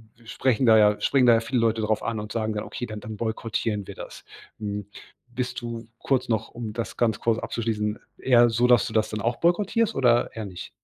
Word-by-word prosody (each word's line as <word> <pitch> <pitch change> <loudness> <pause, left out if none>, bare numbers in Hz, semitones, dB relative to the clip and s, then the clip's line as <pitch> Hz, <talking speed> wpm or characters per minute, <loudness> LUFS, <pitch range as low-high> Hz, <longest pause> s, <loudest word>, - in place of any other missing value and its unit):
wir 115 -1 -21
sprechen 130 +1 +1
da 110 -1 +7
ja 105 -1 +4
springen 135 -2 +3
da 120 - +7
ja 115 - +4
viele 125 +2 -1
Leute 115 -1 +1
drauf 110 0 0
an 115 -2 -2
und 105 0 -7
sagen 110 -1 -1
dann: 105 - -3
„Okay, 120 - -5
dann 110 -2 -7
dann 110 +1 -8
boykottieren 110 -2 -2
wir - - -8
das.“ - - -10 0.3
Hm, 105 -1 -4 0.4
bist 125 0 -4
du 115 -1 -6
kurz 130 -1 0
noch, 110 -1 0
um 115 -2 -6
das 115 +1 -5
ganz 115 -3 +1
kurz 115 -1 +1
abzuschließen, 105 -2 -2 0.2
eher 120 -2 +5
so, 120 +2 +2
dass 120 -3 +5
du 110 - -7
das 110 -1 +1
dann 105 -1 -4
auch 120 +3 -1
boykottierst 205 +6 +1
oder 120 -2 +3
eher 110 -1 -4
nicht? 95 -3 -8
115 Hz, 225 wpm, -25 LUFS, 110-120 Hz, 0.4 s, da